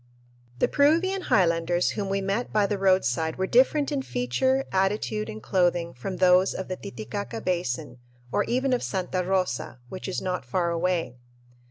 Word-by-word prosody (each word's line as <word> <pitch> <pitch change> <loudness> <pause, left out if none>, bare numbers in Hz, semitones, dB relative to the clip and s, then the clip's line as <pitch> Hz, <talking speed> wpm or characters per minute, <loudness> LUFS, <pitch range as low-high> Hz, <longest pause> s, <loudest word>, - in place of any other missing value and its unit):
The - - +2
Peruvian 335 +7 +2
highlanders 175 - +2
whom 200 -2 -3
we 195 0 0
met 200 +5 -2
by 210 -1 +3
the 200 0 -2
roadside 160 -5 +2
were 190 - -1
different 270 +7 +3
in 280 -2 0
feature, 260 - 0
attitude, 190 - 0
and 110 0 -8
clothing 175 0 +1
from 155 +10 -5
those 185 +1 +4
of 190 - -5
the 185 - -2
Titicaca 125 - -6
Basin 150 -7 -2 0.3
or - - +2
even 255 +2 0
of 245 - +1
Santa 185 -1 -2
Rosa, 180 -10 -1
which 185 - -7
is 190 - -2
not 180 -5 -3
far 170 +7 -1
away. 170 -6 -1
185 Hz, 165 wpm, -26 LUFS, 165-205 Hz, 0.3 s, those